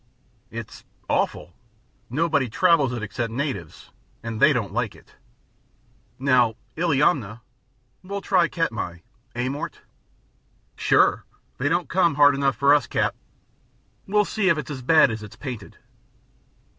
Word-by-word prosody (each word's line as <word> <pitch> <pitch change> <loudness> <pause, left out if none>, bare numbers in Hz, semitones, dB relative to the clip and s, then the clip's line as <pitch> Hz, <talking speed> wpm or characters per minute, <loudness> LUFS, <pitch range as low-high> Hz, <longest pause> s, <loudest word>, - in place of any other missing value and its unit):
"It's - - -8 0.2
awful! 80 +4 -1 0.6
Nobody 145 -1 +1
travels 155 -2 +3
it 120 -3 -4
except 115 +2 -3
natives, 140 +3 -5 0.3
and 115 -2 -5
they 155 - +7
don't 110 -8 -2
like 120 -2 -2
it. - - -20 1.0
Now, 125 -4 +3 0.2
Illiamna 140 - +1 0.3
" - - -42
"We'll 200 +2 -5
try 180 -3 +3
Katmai. 110 - -3 0.3
Eh, 120 +1 -1
Mort?" 140 +3 -5 0.9
"Sure! - - +3 0.4
They 140 +3 +1
don't 175 +2 0
come 170 -4 +2
hard 145 0 +6
enough 135 -1 +1
for 140 +1 +4
us, 145 - +2
Cap. - - 0 0.9
We'll 210 +1 +2
see 200 -3 0
if 165 - +3
it's 150 - -5
as 135 -3 -6
bad 155 0 +5
as 110 -1 -5
it's 105 -2 -11
painted." 125 -8 -8
140 Hz, 135 wpm, -24 LUFS, 120-165 Hz, 1.0 s, they